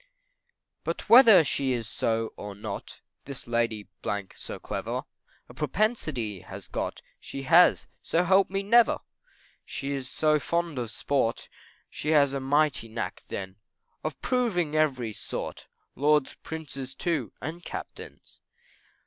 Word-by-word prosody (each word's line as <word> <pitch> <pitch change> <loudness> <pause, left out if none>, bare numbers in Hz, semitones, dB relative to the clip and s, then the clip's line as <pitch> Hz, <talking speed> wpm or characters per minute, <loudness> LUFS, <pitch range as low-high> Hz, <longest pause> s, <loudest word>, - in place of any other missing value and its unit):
But - - -4
whether 230 -7 +9
she 135 -2 0
is 115 -3 -3
so 115 0 -1
or 105 -1 -7
not, 100 - -7 0.2
This 140 -2 -7
Lady 115 -3 -1 0.5
so - - -8
clever, - - -4 0.4
A - - -13
propensity 150 - -1
has - - -10
got, - - -4 0.2
She 135 - -7
has, 170 +6 +6 0.2
so 170 - +1
help 190 +2 +4
me 195 +1 -1
never! 235 +3 +5 0.6
She 140 -1 -5
is 135 -2 -4
so 155 -1 +2
fond 170 -2 -1
of 120 -2 -3
sport, 115 0 -1 0.4
She 150 - -5
has 140 -2 +5
a 140 - -1
mighty 145 -2 +2
knack 110 0 -4
then, 95 -1 -6 0.5
Of 155 -3 -4
proving 195 -12 +1
every 130 -8 +1
sort, - - -6 0.3
Lords, 150 -1 +3
Prince's 140 -4 -6
too, 150 - -1
and 165 +4 -6
Captains. - - -9
145 Hz, 130 wpm, -27 LUFS, 120-170 Hz, 0.6 s, whether